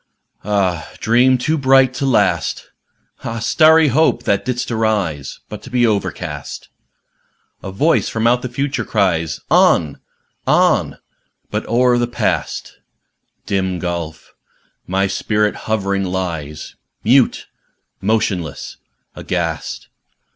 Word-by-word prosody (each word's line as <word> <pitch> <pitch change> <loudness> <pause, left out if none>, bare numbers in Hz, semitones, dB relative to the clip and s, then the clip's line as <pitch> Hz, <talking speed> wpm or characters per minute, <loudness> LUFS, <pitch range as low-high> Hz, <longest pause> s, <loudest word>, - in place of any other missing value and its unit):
Ah, 95 -5 -1
dream 125 +3 +4
too 155 +5 -1
bright 135 -1 +4
to 135 +1 -2
last! 130 - 0 0.5
Ah, 115 0 -4
starry 155 +6 +5
Hope! 135 -3 +2
that 100 -4 +1
didst 125 -1 -3
arise 105 -11 -1
But 105 - -8
to - - -11
be 125 -1 +2
overcast! 105 -4 -3 0.9
A 95 - -6
voice 150 +13 +2
from 115 0 -2
out 120 +1 +3
the 125 - -4
Future 135 +3 -2
cries, 85 -7 0
"On! 75 -4 +3 0.5
on!"âbut - - -1
o'er 125 +1 +3
the 120 - +1
Past 120 - -2 0.7
(Dim 95 -2 -1
gulf!) 85 -3 -5 0.5
my 95 +1 +1
spirit 105 +2 0 0.2
hovering 100 -2 0
lies 85 -5 -4 0.3
Mute, 125 +3 +3 0.6
motionless, 95 -6 -2 0.4
aghast! - - -3
110 Hz, 110 wpm, -18 LUFS, 95-125 Hz, 0.9 s, starry